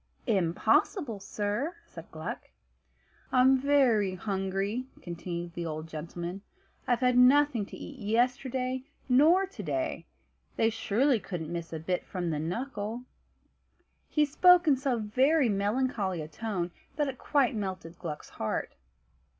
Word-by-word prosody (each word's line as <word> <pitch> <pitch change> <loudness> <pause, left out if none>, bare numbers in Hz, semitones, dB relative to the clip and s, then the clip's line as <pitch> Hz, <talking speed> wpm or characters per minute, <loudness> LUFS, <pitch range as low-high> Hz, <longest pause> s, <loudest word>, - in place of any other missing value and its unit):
"Impossible, 210 - +1
sir," 210 - -2
said - - -11
Gluck. - - -6 0.8
"I'm 260 +1 +6
very 255 -8 +3
hungry," 195 +5 -2
continued 170 0 -6
the 170 -1 -4
old 155 0 -4
gentleman. 170 +4 -6 0.5
"I've 245 -1 +2
had 250 -1 +3
nothing 255 -4 +5
to - - -10
eat 275 - -9
yesterday, 250 +3 0 0.3
nor 310 +9 +5
to 375 - -9
day. 140 -8 -3 0.5
They 225 0 +2
surely 225 +4 +2
couldn't 175 -4 -5
miss 170 -1 -5
a 160 - -3
bit 175 +3 -2
from 175 -3 -3
the 150 - -1
knuckle!" 220 - -4 1.1
He 300 -1 +3
spoke 360 +4 +5
in 290 - +6
so 265 -2 0
very 255 +6 +3
melancholy 205 -3 0
a - - -7
tone, 180 0 -3 0.2
that 295 -1 +1
it 260 -2 -5
quite 280 -4 +2
melted 185 -5 -5
Gluck's 150 -3 -6
heart. 110 - -3
215 Hz, 135 wpm, -29 LUFS, 180-260 Hz, 1.1 s, I'm